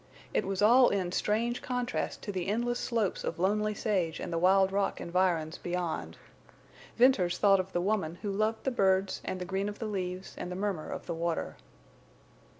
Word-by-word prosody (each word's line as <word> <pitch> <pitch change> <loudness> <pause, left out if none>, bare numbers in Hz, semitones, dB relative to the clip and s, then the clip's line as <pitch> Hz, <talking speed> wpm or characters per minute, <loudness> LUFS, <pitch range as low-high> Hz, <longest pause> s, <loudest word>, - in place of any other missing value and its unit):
It - - 0
was 195 +1 -1
all 245 +4 +7
in 185 -3 -1
strange 230 +6 0
contrast 250 -1 -3
to 205 - -3
the 185 -2 -3
endless 240 +4 0
slopes 225 -6 -1
of - - -3
lonely 210 +4 +1
sage 185 -7 -1
and - - -5
the 165 - 0
wild 190 +2 +4
rock 200 0 0
environs 170 -2 0
beyond. 175 -2 -3 0.8
Venters 205 -8 +4
thought 195 -2 +5
of 185 +1 -3
the 175 - 0
woman 190 -4 0
who 205 - -1
loved 215 +2 0
the 265 - 0
birds 190 -4 +2
and 185 - -4
the 180 - -4
green 195 +2 -1
of 205 - -7
the 225 - -4
leaves 185 -3 -4
and 180 - -5
the - - -4
murmur 190 -4 -2
of - - -6
the - - -3
water. 165 0 -2
195 Hz, 190 wpm, -30 LUFS, 180-215 Hz, 0.8 s, all